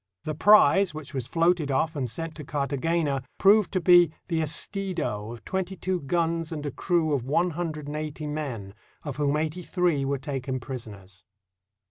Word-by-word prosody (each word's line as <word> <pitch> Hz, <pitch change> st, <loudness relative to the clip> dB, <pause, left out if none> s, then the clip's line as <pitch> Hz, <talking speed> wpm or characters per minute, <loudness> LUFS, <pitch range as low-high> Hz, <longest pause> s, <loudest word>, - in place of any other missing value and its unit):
The 155 Hz, -, -3 dB
prize, 195 Hz, 0 st, +5 dB
which 155 Hz, -2 st, -8 dB
was 130 Hz, -3 st, -3 dB
floated 165 Hz, 0 st, +2 dB
off 155 Hz, +4 st, 0 dB
and 130 Hz, -4 st, -2 dB
sent 165 Hz, +6 st, -5 dB
to 150 Hz, -, -9 dB
Cartagena, 145 Hz, +1 st, -1 dB, 0.2 s
proved 205 Hz, 0 st, +5 dB
to 185 Hz, -, +2 dB
be 175 Hz, -2 st, +6 dB, 0.2 s
the 165 Hz, -2 st, +1 dB
Estido 155 Hz, -, -2 dB
of 115 Hz, -2 st, -10 dB
twenty 190 Hz, 0 st, -2 dB
two 185 Hz, +1 st, -2 dB
guns 165 Hz, +2 st, -1 dB
and 150 Hz, -2 st, -5 dB
a 145 Hz, -, -2 dB
crew 165 Hz, -2 st, 0 dB
of 135 Hz, -4 st, 0 dB
one 170 Hz, +7 st, +1 dB
hundred 155 Hz, -2 st, -4 dB
and 145 Hz, +1 st, -5 dB
eighty 155 Hz, 0 st, -4 dB
men, 135 Hz, -10 st, -4 dB, 0.3 s
of 145 Hz, -4 st, -5 dB
whom 145 Hz, 0 st, +1 dB
eighty 160 Hz, +3 st, -2 dB
three 175 Hz, -5 st, 0 dB
were 140 Hz, +1 st, 0 dB
taken 135 Hz, -1 st, -4 dB
pris 130 Hz, -2 st, -6 dB
oners. 95 Hz, -3 st, -13 dB
155 Hz, 180 wpm, -26 LUFS, 135-170 Hz, 0.3 s, be